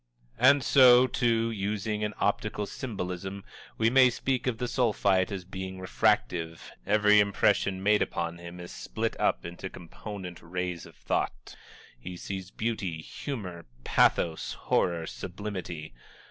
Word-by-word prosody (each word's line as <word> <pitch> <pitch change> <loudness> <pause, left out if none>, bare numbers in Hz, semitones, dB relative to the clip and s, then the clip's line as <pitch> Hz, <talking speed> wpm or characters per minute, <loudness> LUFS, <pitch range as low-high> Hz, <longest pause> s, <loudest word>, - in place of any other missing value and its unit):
And 135 +3 +6
so, 125 -2 +7
too, 115 -2 +1
using 105 0 -2
an 105 0 -2
optical 105 0 0
symbolism, 95 -4 -5 0.3
we 115 +1 +3
may 130 0 +7
speak 130 +2 -1
of 120 -3 0
the 125 - -2
Sulphite 100 -6 +2
as 95 -3 -5
being 95 0 -6
refractive 85 -2 0 0.2
every 105 0 +5
impression 100 -1 +2
made 105 +1 +4
upon 85 -1 -2
him 85 +1 -9
is 90 0 -8
split - - -3
up - - +1
into 85 +2 -6
component 90 +1 -8
rays 90 0 -4
of - - -16
thought - - -3 0.4
he 90 +8 -7
sees 95 0 -6
beauty, 100 -7 -3
humor, 90 - -6 0.2
pathos, 80 -2 +2
horror, 85 -2 0
and 80 - -6
sublimity. 90 - -6
100 Hz, 135 wpm, -28 LUFS, 90-110 Hz, 0.4 s, so